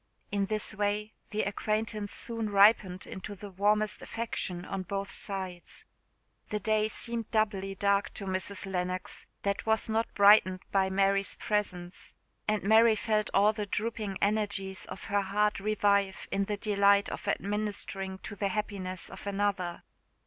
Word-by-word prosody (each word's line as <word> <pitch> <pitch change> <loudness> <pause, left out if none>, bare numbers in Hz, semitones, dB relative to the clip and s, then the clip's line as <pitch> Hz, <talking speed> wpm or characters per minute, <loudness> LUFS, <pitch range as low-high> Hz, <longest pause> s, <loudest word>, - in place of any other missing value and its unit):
In 200 -1 0
this 215 +1 0
way 210 +1 -1 0.2
the 215 0 -1
acquaintance 215 +1 -1
soon 230 -2 -1
ripened 200 -2 +4
into 205 +2 -7
the 200 +1 -9
warmest 210 +3 +1
affection 185 -6 -4
on 195 - -3
both 195 +1 -4
sides. 185 -3 -5 0.6
The 210 - -1
day 215 +1 +2
seemed 230 0 -3
doubly 200 -3 0
dark 200 +1 +1
to 200 - -5
Mrs. 190 +1 -3
Lennox 185 -1 -3 0.2
that 200 +2 -1
was 220 0 +2
not 225 +1 0
brightened 200 -2 +6
by 190 -1 +3
Mary's 195 0 +2
presence; 185 -4 -3 0.3
and 215 -1 +1
Mary 220 +2 +6
felt 215 0 0
all 205 +2 +4
the 210 -2 -4
drooping 210 -1 -2
energies 200 -2 0
of - - -8
her 200 0 +1
heart 210 +2 +1
revive 200 -1 +1
in 195 0 +1
the 205 0 -2
delight 200 -1 +3
of - - -6
administering 200 -2 -2
to 210 - -6
the 200 0 -1
happiness 190 -2 -3
of - - -9
another. 195 -3 -1
200 Hz, 150 wpm, -30 LUFS, 195-215 Hz, 0.6 s, brightened